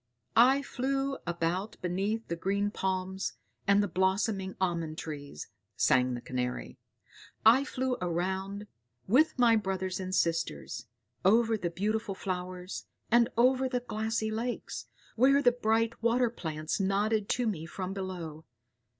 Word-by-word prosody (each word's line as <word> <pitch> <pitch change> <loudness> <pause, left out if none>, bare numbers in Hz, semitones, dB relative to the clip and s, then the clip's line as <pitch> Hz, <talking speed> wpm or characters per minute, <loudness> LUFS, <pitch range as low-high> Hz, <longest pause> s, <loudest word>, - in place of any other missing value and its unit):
"I 265 +4 +6
flew 270 +1 -1
about 175 +4 -1
beneath 195 +5 -1
the 170 - -2
green 200 +4 0
palms 190 0 -2 0.3
and 200 +1 +5
the - - 0
blossoming 190 +1 0
almond 170 -4 -1
trees," 145 - -6 0.3
sang 125 -1 +3
the 120 - -6
Canary; 125 0 -4 0.7
"I 240 +5 +7
flew 260 -2 -1
around, 190 +4 -2 0.4
with 285 +10 +4
my 240 -2 +5
brothers 190 -3 -1
and 185 0 -2
sisters, 165 -9 -1 0.4
over 225 +3 +4
the 180 -5 -2
beautiful 210 +3 -1
flowers, 185 -1 -5 0.2
and 235 0 +5
over 260 +2 +4
the 250 -1 -1
glassy 220 -1 -2
lakes, 235 +3 -4 0.3
where 270 +4 +5
the 245 -3 +5
bright 230 -1 0
water 235 +1 +3
plants 155 -6 -3
nodded 200 +2 +1
to 245 - +1
me 170 -7 -2
from 185 +1 -4
below. 175 -5 -5
195 Hz, 135 wpm, -30 LUFS, 180-230 Hz, 0.7 s, I